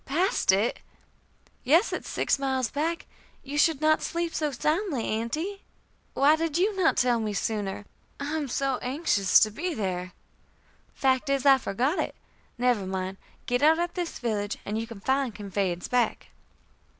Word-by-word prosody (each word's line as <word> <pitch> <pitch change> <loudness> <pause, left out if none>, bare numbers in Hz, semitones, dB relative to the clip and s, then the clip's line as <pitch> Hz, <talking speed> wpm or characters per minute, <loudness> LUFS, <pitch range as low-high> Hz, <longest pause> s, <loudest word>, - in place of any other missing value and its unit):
"Passed 330 - +2
it!" 200 +5 +1 0.8
"Yes. 330 - +3
It - - -1
is - - -12
six - - 0
miles 265 -3 -1
back. 325 +4 -2 0.4
You 275 +2 -6
should 320 -2 +3
not 310 0 +3
sleep 340 0 -2
so 305 -1 0
soundly, 305 - -1
Aunty." 310 - -3 0.5
"Why 290 +3 +5
did 325 -1 -1
you 400 +4 +2
not 370 -3 +2
tell 245 -1 +3
me 215 -2 -2
sooner? 205 -1 -2 0.3
I 290 +2 -3
am 305 -3 -2
so 270 0 0
anxious 250 - +3
to 215 - +3
be 335 - -3
there." 185 -4 -3 0.8
"Fact 265 +1 +1
is, 275 -1 0
I 270 -1 +7
forgot 260 - -1
it. - - -2 0.4
Never 240 -5 +1
mind. 190 0 -3 0.3
Get 245 0 0
out 315 +2 +5
at 345 0 -2
this 350 -2 -4
village, 210 -4 -2
and 210 +2 -2
you 225 - -4
can 225 -4 -10
find 265 -3 0
conveyance 195 -4 -2
back." 245 -3 0
265 Hz, 165 wpm, -27 LUFS, 215-315 Hz, 0.8 s, I